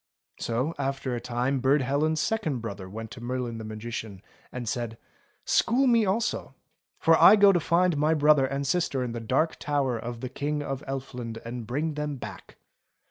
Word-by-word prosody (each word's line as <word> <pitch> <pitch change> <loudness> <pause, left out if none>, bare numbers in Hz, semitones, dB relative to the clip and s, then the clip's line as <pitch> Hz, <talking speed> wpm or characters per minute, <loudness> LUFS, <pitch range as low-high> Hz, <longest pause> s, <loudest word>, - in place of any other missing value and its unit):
So 125 +8 -1
after 135 -2 -2
a 120 - -3
time 125 +3 -1
Burd 135 +2 +3
Helen's 150 +4 +1
second 160 -7 0
brother 100 -5 -6
went 110 +2 -7
to 120 - -9
Merlin 120 -1 -3
the - - -6
Magician 110 -2 -6 0.3
and 125 -2 -6
said: 115 -1 -3 0.3
" - - -40
School 250 +4 +3
me 230 -4 +4
also, 225 +5 -1 0.4
for 165 - +5
I 210 - +10
go 200 -1 +7
to 180 - +2
find 170 +1 +2
my 155 +2 +3
brother 150 -2 +4
and 140 +1 -3
sister 140 -3 0
in 125 - -3
the 115 - -4
Dark 135 +8 0
Tower 140 -5 0
of 120 0 -6
the 130 - -4
King 145 +3 -2
of 135 -1 -4
Elfland 125 -4 -5
and 115 -1 -6
bring 150 +6 -1
them 150 -1 -3
back." 125 - -9
135 Hz, 190 wpm, -27 LUFS, 120-155 Hz, 0.4 s, I